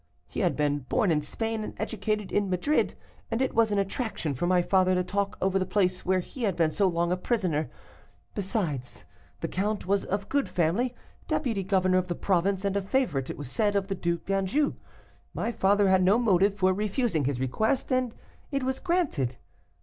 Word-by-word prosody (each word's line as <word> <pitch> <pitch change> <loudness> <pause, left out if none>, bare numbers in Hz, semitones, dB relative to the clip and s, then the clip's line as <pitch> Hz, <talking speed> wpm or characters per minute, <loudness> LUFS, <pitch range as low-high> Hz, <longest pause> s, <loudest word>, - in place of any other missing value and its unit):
He - - -6
had - - +2
been 145 -1 +1
born 190 - +1
in 150 -2 +2
Spain 225 +8 -3
and - - -6
educated 215 -1 -2
at 205 - +4
Madrid, 195 - +1 0.3
and 225 - -1
it 265 - 0
was 225 -1 +3
an 205 - +1
attraction 195 - -2
for 155 +7 -1
my 180 -1 +3
father 185 0 +3
to 180 - +1
talk 200 +2 -2
over 195 0 +1
the - - +1
place 185 -2 +1
where 185 0 +2
he 255 - -10
had 200 -6 +1
been 165 -2 +2
so 195 +4 +2
long 170 -1 0
a - - +3
prisoner. 180 -7 0 0.6
Besides, 180 - -3 0.4
the - - -1
count 205 +3 -2
was 200 +1 +1
of 200 +1 -2
good 280 -1 0
family, 195 +10 +1 0.3
deputy 225 -6 0
governor 185 -1 +3
of 185 - -3
the 175 - -2
province, 190 +2 +1
and 200 0 0
a 200 - +1
favorite, 195 - 0
it - - -5
was 145 -3 -7
said, 205 +2 +1
of 195 0 0
the - - 0
Due 170 -2 -1
d'Anjou; 195 - 0 0.6
my 235 - -1
father 205 -2 +3
had 190 0 +4
no 190 +4 +5
motive 200 -4 +3
for 185 -2 +3
refusing 205 - 0
his 135 -2 -1
request, 220 - 0
and 255 -2 +1 0.3
it 275 -2 -1
was 260 0 -1
granted. 290 - 0
195 Hz, 200 wpm, -28 LUFS, 180-220 Hz, 0.6 s, no